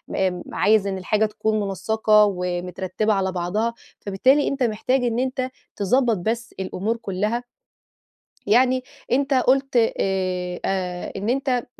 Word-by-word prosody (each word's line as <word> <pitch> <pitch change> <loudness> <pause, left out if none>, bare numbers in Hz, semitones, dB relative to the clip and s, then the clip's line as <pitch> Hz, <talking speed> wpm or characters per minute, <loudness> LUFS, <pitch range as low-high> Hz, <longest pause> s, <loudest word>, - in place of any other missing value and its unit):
إمم، 185 -2 0
عايز 210 -1 +3
إن 195 -1 -2
الحاجة 210 +3 +1
تكون 215 0 -1
منسّقة 210 +1 +3
ومترتبة 180 +3 -1
على 190 -1 0
بعضها 190 +6 -1 0.3
فبالتالي 255 +9 +2
أنت 275 -1 -1
محتاج 245 +3 +1
إن 235 -1 0
أنت 255 0 -1 0.3
تضبط 230 +3 +2
بس 230 +5 -3
الأمور 195 +4 -2
كلها، 210 +3 -2 1.0
يعني 255 +4 +3 0.3
أنت 275 +2 +2
قُلت 265 +1 +2
آآ 185 -5 0
أ 180 -2 -2
إن 205 - -3
أنت 255 -1 0
215 Hz, 125 wpm, -23 LUFS, 190-245 Hz, 1.0 s, عايز